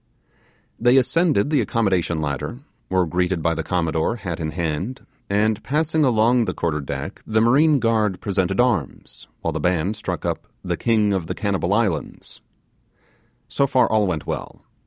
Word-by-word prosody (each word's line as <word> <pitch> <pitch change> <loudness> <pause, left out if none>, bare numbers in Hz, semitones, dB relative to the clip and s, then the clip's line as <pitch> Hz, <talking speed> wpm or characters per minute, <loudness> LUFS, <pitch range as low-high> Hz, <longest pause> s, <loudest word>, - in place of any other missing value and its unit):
They 125 +3 +4
ascended 145 - +2
the 150 - +3
accommodation 95 -7 0
ladder, 75 - -3 0.3
were 95 -1 +2
greeted 90 0 -1
by 85 - +2
the 80 - -2
Commodore, 80 +2 0
hat 90 -7 -5
in 80 -1 -2
hand, 85 - -3 0.2
and 105 +1 +1
passing 155 +2 0
along 120 -1 +3
the - - -3
quarter 80 -3 -1
deck, 70 +6 -6
the 110 0 +2
marine 140 +7 +4
guard 110 -5 +1
presented 95 -2 -1
arms, 110 - -1
while 85 - -1
the 80 - -2
band 90 +5 0
struck 105 - -4
up - - -3 0.2
'The - - -2
King 110 -3 +2
of 90 -4 -2
the - - -3
Cannibal 95 -3 -1
Islands'. 100 - -2 1.1
So 140 - +1
far 130 -1 +3
all 110 -2 +3
went 80 -5 -2
well. - - -6
100 Hz, 160 wpm, -22 LUFS, 85-120 Hz, 1.1 s, They